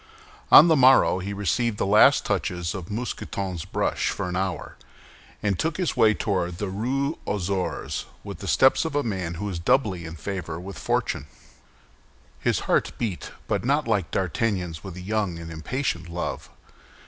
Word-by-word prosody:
On 155 - +10
the 160 - +5
morrow 130 -8 +5
he 95 +2 -4
received 100 +3 0
the - - 0
last 105 +2 +5
touches 90 -2 -1
of 90 -3 -7
Mousqueton's 100 -6 -4
brush - - -1
for 100 - -3
an 90 - -3
hour, 95 -4 -3 0.7
and 100 -3 0
took 160 0 -1
his 180 -6 -1
way 110 -4 +4
toward 90 -4 -1
the 100 +1 -3
Rue 135 +9 -1
aux 105 - -1
Ours 95 -2 -3 0.2
with - - -8
the - - -7
steps 130 0 +4
of 160 -3 -4
a 145 - +2
man 95 -6 -3
who 100 +5 -5
was 95 -4 -3
doubly 95 -4 +1
in 80 0 -7
favor 90 -2 -5
with 90 -3 -8
fortune. - - -1 1.1
His - - 0
heart - - +1
beat, 105 -7 -3 0.2
but - - -1
not 140 +3 +1
like 100 -6 +1
D'Artagnan's 90 -3 -1
with 95 -4 -8
a 90 - -8
young 100 -2 -1
and 85 0 -8
impatient 85 - -3
love. 85 +1 -4
100 Hz, 170 wpm, -25 LUFS, 90-120 Hz, 1.1 s, On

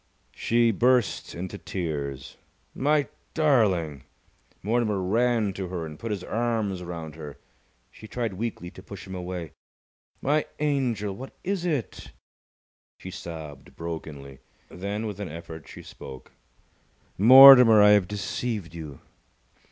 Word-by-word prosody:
She 115 0 +2
burst 120 0 +1
into 95 +3 -6
tears. 70 -6 -5 0.4
"My 145 +1 +1 0.3
darling!" 100 - +1 0.6
Mortimer 110 -1 0
ran 110 +2 +1
to 95 0 -5
her 90 -2 -4
and 75 -1 -10
put 115 - -5
his 100 -4 -3
arms 110 -5 -2
round 85 -3 -7
her. 75 -2 -9 0.5
She 110 - -13
tried 115 -3 -3
weakly 95 -3 -5
to - - -13
push 95 -3 -10
him 95 - -9
away. 90 -3 -6 0.7
"My 150 +3 0
angel! 125 -9 -1
What 130 +6 -10
is 190 -1 -2
it?" 150 -9 -3 0.8
She 95 - -9
sobbed 80 -6 -9
brokenly. 75 -5 -7 0.3
Then, 100 +4 -4
with 105 -2 -6
an 100 -4 -5
effort, 80 0 -9
she - - -11
spoke. 65 -1 -11 0.9
"Mortimer, 125 -1 +10
I 105 - +7
have 100 -3 +4
deceived 105 -2 -4
you!" 75 -5 -9
100 Hz, 130 wpm, -26 LUFS, 85-120 Hz, 0.9 s, Mortimer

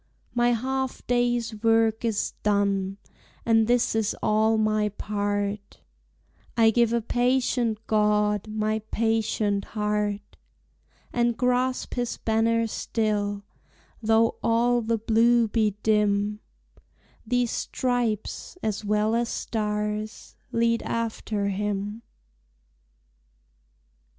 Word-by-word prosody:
My 240 0 +3
half 265 +2 -2
day's 240 -3 0
work 225 0 +3
is 225 -3 -1
done, 200 -2 +1 0.5
And 225 -1 +4
this 240 0 +2
is 220 -1 0
all 220 +1 +3
my 215 -1 +1
part, 205 0 -3 0.8
I 225 -1 +6
give 235 0 +3
a 235 -1 0
patient 245 -1 +1
God 210 -1 +2
My 215 0 -1
patient 220 -2 0
heart; 210 -1 -2 0.8
And 235 -1 +1
grasp 250 +1 0
his 245 -1 -2
banner 230 +1 +1
still, 210 -2 -2 0.6
Though 225 +1 +3
all 240 +1 +2
the 230 0 0
blue 230 +2 +3
be 215 -2 +1
dim; 210 -1 +2 0.8
These 245 0 0
stripes 245 - -2
as 215 -1 -2
well 210 +1 +1
as 235 0 0
stars 210 0 -3 0.2
Lead 230 0 +2
after 220 -3 -2
him. 205 +2 -3
220 Hz, 100 wpm, -26 LUFS, 210-235 Hz, 0.8 s, I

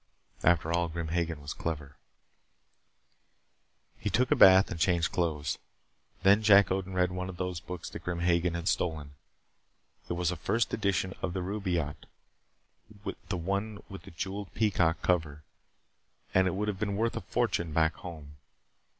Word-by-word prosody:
After 85 -1 +3
all, 85 0 +1
Grim 85 -1 -4
Hagen 80 -3 -2
was 70 - -4
clever 75 -4 -5 2.0
He - - -2
took 125 0 +1
a - - +6
bath 95 0 +7
and 85 - -4
changed 85 -1 +2
clothes. 80 -5 -1 0.6
Then 100 +2 +6
Jack 100 -2 +6
Odin 95 0 -2
read 90 0 +2
one 90 0 -4
of 90 - -8
those 90 -2 -3
books 90 -1 -7
that - - -8
Grim 85 -1 -3
Hagen 85 0 +2
had 85 +1 -4
stolen. 80 -7 -1 1.0
It - - 0
was 85 0 0
a - - -3
first 110 +8 0
edition 95 -3 0
of 90 - -2
the 95 - -2
Rubaiyat, 90 -7 -2 1.2
the 95 - -1
one 100 +4 -3
with 95 -1 -8
the - - -12
jeweled 95 +4 -5
peacock 90 -6 +1
cover, 80 -4 0 0.9
and 95 0 +4
it 95 - -1
would 105 +2 -1
have 100 -3 -2
been 100 -1 -1
worth 115 +2 0
a - - -3
fortune 85 -2 -1
back 80 +1 +2
home. 75 -4 -10
90 Hz, 160 wpm, -30 LUFS, 80-95 Hz, 2.0 s, bath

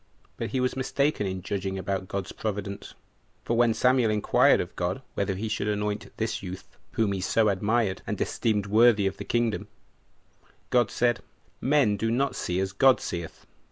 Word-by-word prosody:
But - - -4
he 130 - -1
was 125 0 0
mistaken 135 -3 0
in 95 -1 -4
judging 95 0 -3
about 95 0 -3
God's 100 -1 -4
providence; 100 -1 -5 0.5
for 120 - 0
when 120 0 +4
Samuel 125 -2 +3
inquired 105 -1 +4
of - - -4
God - - -2
whether 95 - -1
he 110 +4 -3
should 105 -1 -2
anoint 105 0 -2
this 110 0 -2
youth, 95 -1 -9 0.2
whom 110 -3 +1
he 95 -2 -2
so 110 +3 +2
admired, 100 0 0
and - - -3
esteemed 105 -3 0
worthy 110 0 +5
of 95 - -1
the - - -6
kingdom, 110 -5 0 1.0
God 120 -4 +3
said, 120 0 +1 0.4
"Men 130 -7 +3
do 115 +3 -1
not 125 +2 0
see 90 -8 -2
as 95 0 -2
God 130 +5 +5
seeth. 85 -2 -6
105 Hz, 175 wpm, -27 LUFS, 95-120 Hz, 1.0 s, worthy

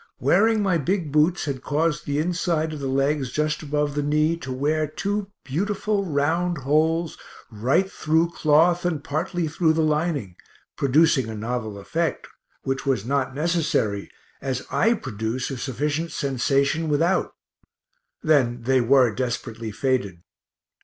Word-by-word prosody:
Wearing 220 +1 +3
my 185 -4 +2
big 170 0 -1
boots 155 +5 +2
had 135 -4 -3
caused 150 +2 -1
the 145 0 -1
inside 165 -1 0
of 150 - -6
the 140 - -3
legs 135 0 0
just 150 +1 -1
above 150 -1 -1
the 145 - -1
knee 150 +3 +2
to 130 -6 -7
wear 150 +4 0
two 200 +6 -3 0.2
beautiful 200 +6 -1
round 165 +3 0
holes 155 +4 +1 0.3
right 130 - +1
through 160 +2 +1
cloth 170 +2 +3
and 160 -5 -1
partly 170 +3 -2
through 160 +1 +2
the 160 0 +1
lining, 150 - -1 0.4
producing 140 -2 +3
a 110 - -5
novel 110 -1 -4
effect, 165 +12 -2 0.4
which 135 0 -2
was 130 -7 0
not 135 0 -1
necessary, 150 - 0 0.3
as 130 -2 -3
I 230 +1 +3
produce 120 - -4
a 135 - -4
sufficient 145 +6 -2
sensation 140 +4 0
without 165 +6 +1 0.9
then 125 -6 +2
they 130 +1 +3
were 125 -1 +4
desperately 115 -2 -3
faded. 105 -8 -1
150 Hz, 140 wpm, -24 LUFS, 130-165 Hz, 0.9 s, were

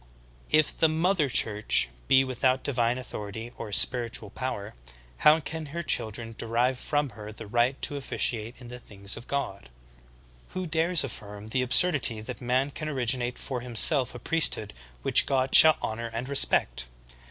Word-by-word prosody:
22. - - +2
If 155 - 0
the 160 - +3
"2vIother 160 -2 -1
Church" 105 - +3 0.2
be 135 0 +3
without 130 0 -2
divine 120 -3 -2
authority 110 -2 -9
or 110 -2 -9
spiritual 115 -1 +1
power, 120 -5 -7 0.4
how 155 +1 +3
can 160 0 -7
her 170 +4 -7
children 115 -4 -1
derive 120 +3 -2
from 145 0 -3
her 105 0 -11
the 110 +1 -10
right 120 +5 -1
to 145 - 0
officiate 120 -3 -4
in 120 -2 -11
the 125 0 -9
things 100 -3 -5
of 120 - -12
God? 100 - -6 0.9
Who 185 - -4
dares 165 +1 0
affirm 105 -4 -9
the 130 +3 -2
absurdity 125 -2 +5
that 110 - -9
man 130 +3 -2
can 155 +2 -7
originate 125 -2 -2
for 130 -3 -7
himself 125 +2 +4
a - - -7
priesthood 140 -5 +1 0.3
which - - +4
God 130 -1 -2
shall 155 -1 +8
honor 115 +1 -5
and 115 +3 -6
respect? - - +2
125 Hz, 165 wpm, -25 LUFS, 115-140 Hz, 0.9 s, shall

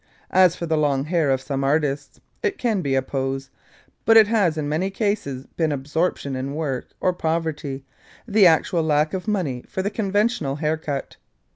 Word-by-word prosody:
As 185 -2 +5
for 170 - -4
the 160 -1 +1
long 140 -2 +1
hair 165 -2 +1
of 130 -1 +1
some 135 0 -3
artists, 145 0 0 0.2
it 400 -4 -1
can 225 -6 0
be 140 -4 0
a 135 - +2
pose, 135 0 -3 0.5
but 225 0 +6
it 220 - +9
has 200 -7 +1
in 150 -2 -2
many 160 +6 0
cases 195 - -2
been 160 -2 -1
absorption 145 0 -1
in 135 +2 -4
work, 140 -5 -3
or 185 - +1
poverty 160 -5 -2 0.4
the 205 -3 +6
actual 165 +1 +3
lack 155 -1 +1
of 190 +2 -4
money 165 -13 -1
for 190 - -3
the 205 - -1
conventional 205 - 0
haircut. 150 -2 -3
155 Hz, 175 wpm, -23 LUFS, 140-185 Hz, 0.5 s, it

